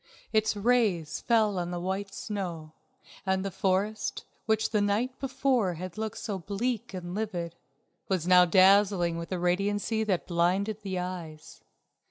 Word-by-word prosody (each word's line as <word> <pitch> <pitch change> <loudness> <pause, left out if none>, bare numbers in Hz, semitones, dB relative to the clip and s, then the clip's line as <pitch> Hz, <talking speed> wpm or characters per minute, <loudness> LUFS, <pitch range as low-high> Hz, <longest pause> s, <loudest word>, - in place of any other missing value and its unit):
Its 220 0 +2
rays 205 -8 +1
fell 215 -5 +3
on 175 0 -3
the 175 0 -3
white 190 +3 -3
snow, 175 -8 -5 0.5
and 190 0 0
the 195 - -2
forest, 195 +3 -1 0.2
which 220 0 +1
the 210 -2 +2
night 220 +6 0
before 260 -8 +1
had 180 +1 -7
looked 220 -1 -4
so 200 -3 -4
bleak 210 +5 -3
and 180 -2 -6
livid, 180 -5 -3 0.6
was 185 -4 0
now 180 0 +7
dazzling 185 -1 +4
with 170 +2 -6
a 185 - 0
radiancy 200 +5 0
that 195 -5 0
blinded 190 +5 0
the 190 -2 -4
eyes. 175 -4 -6
195 Hz, 150 wpm, -28 LUFS, 180-215 Hz, 0.6 s, now